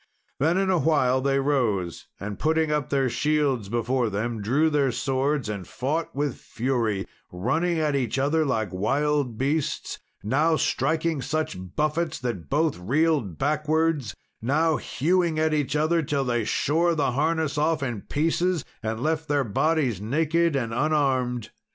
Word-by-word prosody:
Then, 160 +6 +2
in 190 0 +2
a 180 - +3
while, 130 -4 +2
they 135 0 +2
rose, 115 - 0
and 100 0 -6
putting 160 0 +1
up 150 -2 -1
their 135 -2 +2
shields 135 -4 0
before 120 +1 0
them, 110 +2 -2
drew 145 +10 +2
their 140 -3 +2
swords, 135 +2 0
and 100 -4 -5
fought 150 +5 -2
with 145 -3 -1
fury, 115 -5 -1 0.3
running 160 - 0
at 155 -2 +1
each 130 -2 -1
other 145 +4 +2
like 110 - -1
wild 135 +4 0
beasts 140 +4 -1 0.2
now 150 +9 +2
striking 160 +1 0
such 155 +4 -2 0.2
buffets 155 +2 0
that 120 -9 -4
both 150 - +1
reeled 135 - +1
backwards, 150 -3 0 0.3
now 155 +6 +2
hewing 170 +3 0
at 155 0 +2
each 150 -2 0
other 160 +3 +2
till 140 -2 -1
they 120 -3 0
shore 165 +9 +1
the 145 -4 +1
harness 155 +2 0
off 155 -1 +1
in 120 -6 -3
pieces, 165 +2 0 0.2
and 110 0 -3
left 160 0 0
their 145 -2 +2
bodies 135 - 0
naked 160 +7 +1
and 115 -4 -1
unarmed. 130 -4 0
145 Hz, 150 wpm, -25 LUFS, 120-155 Hz, 0.3 s, a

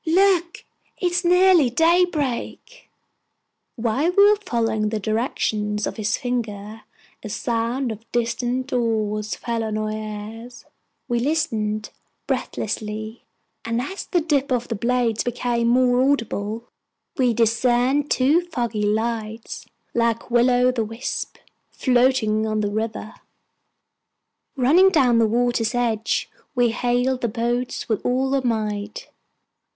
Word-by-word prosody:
"Look, 350 0 +2 0.3
it 355 -2 0
is 360 +2 0
nearly 360 -5 +5
daybreak!" 335 - 0 0.9
While 250 +8 0
we 405 +2 +7
were - - +4
following 225 - -1
the 215 0 -2
direction 215 -1 -1
of - - -5
his 215 -1 0
finger, 220 -3 -4 0.4
a - - -6
sound 240 0 -1
of 225 +1 -10
distant 240 +2 -1
oars 215 -3 -1
fell 230 -1 -3
on 215 -1 -2
our 215 0 -2
ears. 215 +2 -7 0.4
We 240 -2 0
listened 215 -7 -1 0.3
breathlessly, 215 +1 -4 0.4
and 230 +1 -1
as 375 +11 -5
the 350 - +1
dip 285 -4 0
of 245 -1 0
the 230 - -1
blades 235 0 0
became 240 -1 -1
more 250 +1 +3
audible, 230 -4 -1 0.5
we 250 -2 +2
discerned 245 +5 +2
two 285 +7 +3
foggy 240 -10 -3
lights, 220 +1 -3 0.3
like 230 0 0
will 240 +1 +4
o'the 250 -1 +2
wisps, 225 +3 -5 0.3
floating 245 -4 +2
on 215 0 0
the 205 -1 -1
river. 215 +1 -3 1.4
Running 305 +9 +5
down 255 -9 +3
to 225 - +4
the - - +2
water's 240 0 0
edge, 230 -2 0 0.3
we 245 -2 +3
hailed 245 +2 0
the 235 - +1
boats 240 +2 -2
with 220 -3 -1
all 260 +2 0
our 275 - +2
might. 220 - -3
240 Hz, 125 wpm, -22 LUFS, 220-260 Hz, 1.4 s, we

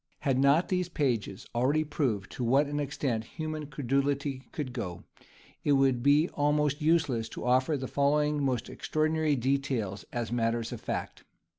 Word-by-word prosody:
Had 135 -4 +1
not 140 +5 +4
these 180 -1 0
pages 120 - -1
already 135 +6 +2
proved 130 - -2
to 125 - -4
what 135 +5 +4
an 145 +1 -3
extent 135 -5 -1
human 155 +3 -5
credulity 140 0 -1
could 135 -5 -4
go, 90 -8 -5 0.6
it 145 - +3
would 135 -3 +3
be 145 +5 +4
almost 150 0 +1
useless 150 -8 +2
to - - -7
offer 130 +4 +3
the 130 -1 -4
following 150 +1 +1
most 130 -4 0
extraordinary 155 -1 0
details 130 -6 -1
as 120 -2 -3
matters 115 -1 0
of - - -6
fact. - - -4
140 Hz, 155 wpm, -29 LUFS, 125-150 Hz, 0.6 s, not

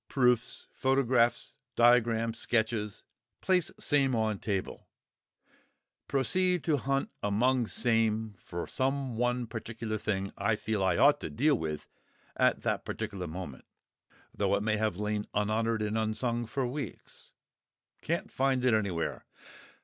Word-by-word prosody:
proofs, 125 -3 +1
photographs, 130 -1 +1 0.2
diagrams, 115 -1 +3
sketches; 110 -3 -1 0.4
place 185 -3 +2
same 135 -4 +2
on 110 -3 0
table; 100 -3 -3 1.2
proceed 180 +7 +1
to 155 -3 +2
hunt 135 +1 -1
among 120 +4 +2
same 110 -2 +1
for 85 0 -5
some 135 -2 -1
one 125 +1 0
particular 110 -1 -5
thing 100 -2 -2
I 105 +2 +2
feel 105 -2 -2
I 90 -2 +2
ought 145 +1 +5
to - - -5
deal 150 +6 +2
with 80 - -3 0.5
at - - +2
that - - 0
particular 100 -5 -4
moment 80 -5 -7 0.7
(though 100 -1 +1
it 100 - -1
may 110 0 +1
have 105 -4 0
lain 105 0 -2
unhonoured 110 +2 +1
and 105 +1 -1
unsung 110 +2 -1
for 135 +3 -1
weeks); 130 -2 -7 0.7
can't - - -2
find 130 -1 +1
it 125 - +4
anywhere. 100 -6 -1
115 Hz, 130 wpm, -30 LUFS, 105-130 Hz, 1.2 s, ought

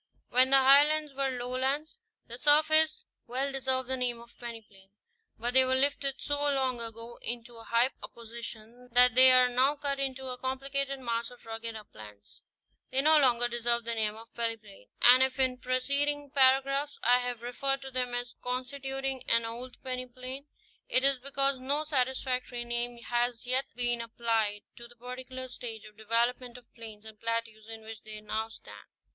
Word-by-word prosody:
When 255 +1 +5
the 270 - +7
Highlands 290 +3 +5
were 275 0 -1
lowlands, 260 - -2 0.3
their 240 +2 -9
surface 310 +2 +4 0.2
well 265 +3 -2
deserved 260 -1 0
the 260 - 0
name 245 -2 -2
of 235 0 -16
peneplain; 215 -5 -10 0.5
but 240 +2 -1
they 260 0 +7
were 260 0 +2
lifted 275 0 +1
so 290 0 0
long 265 -4 +1
ago 230 +1 -8
into 240 0 -5
so 230 - -12
high 235 +3 +2
a - - -6
position 235 +1 -10
that 250 0 +7
they 255 +1 +9
are 255 0 +6
now 255 +4 +2
cut 280 -1 -3
into 265 -1 -3
a 250 0 -4
complicated 275 +1 -3
mass 235 -2 -2
of 245 -1 -17
rugged 225 0 -6
uplands. 105 - -13 0.5
They 265 - +2
no 310 +1 +7
longer 240 -3 +3
deserve 235 0 +1
the 230 0 -1
name 215 -2 -1
of 225 +2 -13
peneplain; 220 - -5 0.2
and 250 +1 +9
if 265 0 +1
in 255 -1 +1
preceding 280 +3 -1
para 270 -1 +5
graphs 280 +2 -3
I 245 +2 +5
have 245 -2 -4
referred 270 +3 -2
to 265 - -8
them 250 -1 -2
as 245 0 -4
constituting 270 +1 -4
an 230 0 +4
old 240 +2 -7
peneplain, 255 +2 -6 0.4
it 255 - +4
is 275 -1 +3
because 275 0 0
no 280 +4 -1
satisfactory 255 -3 -2
name 240 0 -2
has 240 0 -1
yet 255 +2 +1
been 240 -1 -1
applied 225 -3 -1
to 235 - -10
the 240 - -18
par 250 +2 -8
ticular 260 0 -8
stage 230 -4 -8
of 210 0 -14
development 235 +3 -1
of 245 - -18
plains 220 -2 -11
and 220 -1 -11
plateaus 230 -1 -4
in 225 -1 -9
which 220 -1 -10
they 215 0 -9
now 220 +1 -4
stand. 225 - -13
250 Hz, 180 wpm, -29 LUFS, 230-270 Hz, 0.5 s, they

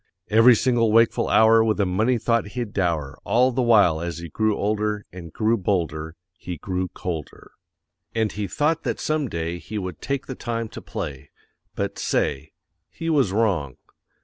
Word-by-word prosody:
Every 115 +3 +7
single 115 -2 +2
wakeful 115 +1 +3
hour 110 0 +6
With 110 -1 0
a 100 - +3
money 110 +7 +1
thought 115 -1 0
he'd 120 -4 -3
dower; 85 -8 -1
All 125 +3 +3
the 130 +1 0
while 105 -9 +4
as 85 0 -4
he 85 0 -7
grew 110 +4 0
older, 105 0 -1
And 85 -3 -9
grew 110 +6 +1
bolder, 80 -5 -2 0.2
he 90 -1 -7
grew 90 +3 -3
colder. 80 -4 -7 0.6
And 110 -2 +1
he 105 -1 -4
thought 150 - 0
that - - -3
some 155 -4 -1
day 85 +1 -3
He 110 +4 -7
would 90 -5 -5
take 140 -1 -2
the 130 - -5
time 115 -2 -4
to - - -9
play; 70 -3 -6 0.5
But, - - -3
say 70 -2 -1 0.4
he 165 0 -3
was 135 -11 +2
wrong. 95 - 0
105 Hz, 175 wpm, -23 LUFS, 85-115 Hz, 0.6 s, Every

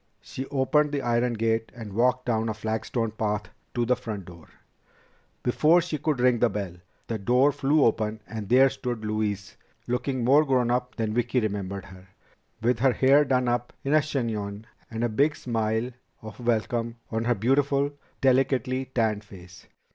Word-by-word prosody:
She 130 +1 -7
opened 145 +2 +2
the 140 -2 -2
iron 120 0 +1
gate 115 0 0
and 110 -4 -8
walked 125 +3 +2
down 115 -2 0
a 110 - -2
flagstone 110 +1 -2
path 105 -1 -2 0.3
to 120 -1 +1
the 125 +2 +3
front 105 -6 -6
door. 85 -2 -13 1.0
Before 155 +7 +4
she 165 -3 -3
could 150 -2 0
ring 125 -1 +3
the - - +4
bell, 100 -3 -4 0.3
the 115 -2 -3
door 125 +7 +3
flew 145 +1 +2
open 110 -1 0
and 110 -3 -6
there 130 +2 +6
stood 120 -4 -4
Louise, 105 -2 -2 0.3
looking 125 +1 -1
more 140 +5 +5
grownup 125 -2 0
than 110 -2 -2
Vicki 120 +2 +1
remembered 100 -3 -3
her, 95 -1 -14 0.6
with 120 0 +2
her 130 0 +4
dark - - -12
hair 140 +3 +6
done 130 -2 +1
up 120 0 -1
in 140 +1 0
a 155 - +6
chignon 110 -7 -3 0.2
and 115 0 -3
a - - +3
big 140 +7 +2
smile 115 -2 -1 0.3
of 110 0 -9
welcome 115 0 -1 0.2
on 115 0 -1
her 120 0 +2
beautiful, 140 +5 +2 0.3
delicately 130 0 +2
tanned 110 -4 0
face. 90 -3 -14
120 Hz, 170 wpm, -26 LUFS, 110-130 Hz, 1.0 s, there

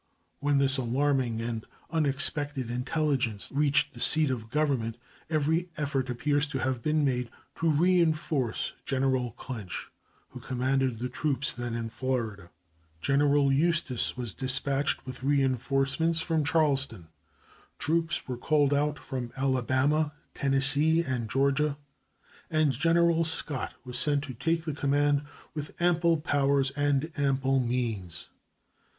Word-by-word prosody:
When 145 0 +1
this 135 0 +3
alarming 130 -2 0
and 115 -2 -3 0.3
unexpected 145 -4 0
intelligence 125 -4 -1
reached 145 +1 +2
the - - -11
seat 155 -3 +2
of 115 -3 -5
Government, 130 -6 0 0.3
every 160 +3 +1
effort 140 -3 -1
appears 145 +4 0
to 140 - -4
have 130 -2 -1
been 155 +2 +1
made 125 -3 -1 0.3
to 165 - +1
reenforce 155 -6 +1
General 130 -3 0
Clinch, 115 -7 -7 0.4
who - - -10
commanded 130 -1 0
the 125 +3 -3
troops 145 +1 -1
then 120 -1 -4
in 115 -1 -3
Florida. 115 -7 -3 0.5
General 140 - +3
Eustis 145 -6 +1
was 120 -5 -4
dispatched 135 +2 0
with 130 -1 -8
reenforcements 135 +3 +1
from 160 -1 0
Charleston, 140 - +1 0.7
troops 165 0 0
were 125 -2 -4
called 145 +2 +2
out 145 +1 +1
from 130 -3 -5
Alabama, 135 +3 +1 0.2
Tennessee, 140 +4 +4
and 125 -6 -3
Georgia, 140 +3 +1 0.7
and 155 -2 +2
General 165 +4 +3
Scott 160 -4 -2
was 125 -1 -2
sent 145 -1 +2
to 140 -2 -6
take 165 +7 -1
the 155 - -2
command, 145 0 +1 0.3
with 150 -1 -7
ample 170 -1 +3
powers 140 -2 +1
and 145 +2 0
ample 135 -1 +2
means. 115 -8 -3
140 Hz, 125 wpm, -28 LUFS, 130-150 Hz, 0.7 s, Tennessee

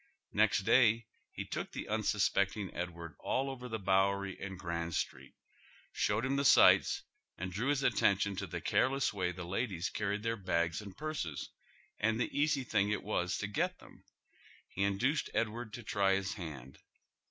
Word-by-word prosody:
Next 105 -1 +3
day 115 +1 +4 0.3
he - - -5
took - - -5
tlie - - -5
unsuspeeting 100 -2 +1
Edward 85 -2 -5
alt 135 +1 -1
over 125 -2 -7
the 110 - -2
Bowei 100 0 +2
y - - -20
and 95 -1 -5
Grand 85 -2 -3
Street, 65 0 -4 0.6
showed 105 +4 0
him 135 +1 0
the 140 - +1
sights - - +6 0.3
and 95 +1 -4
drew 105 +8 -2
his 145 -1 +1
at 120 - +2
tention 100 0 +3
to - - -3
the - - -5
careless 135 -2 +2
way 90 -3 -1
the 90 0 -7
ladies 95 -1 -2
carried 105 0 -2
tlieir 115 -3 -2
bags 85 -2 0
and 100 -2 -10
purses 150 - -4 0.5
and 110 +1 +1
the 125 - -2
easy 145 -1 +2
thing 100 -4 +1
it 105 - -1
was 90 -4 -1
to - - -2
get 100 0 -1
them. - - -17 0.7
He 95 - -5
induced 110 +10 +1
Edward 115 0 -1
to 120 - -7
try 100 -2 +2
his 95 0 -2
hand. 70 - -8
100 Hz, 175 wpm, -33 LUFS, 95-115 Hz, 0.7 s, sights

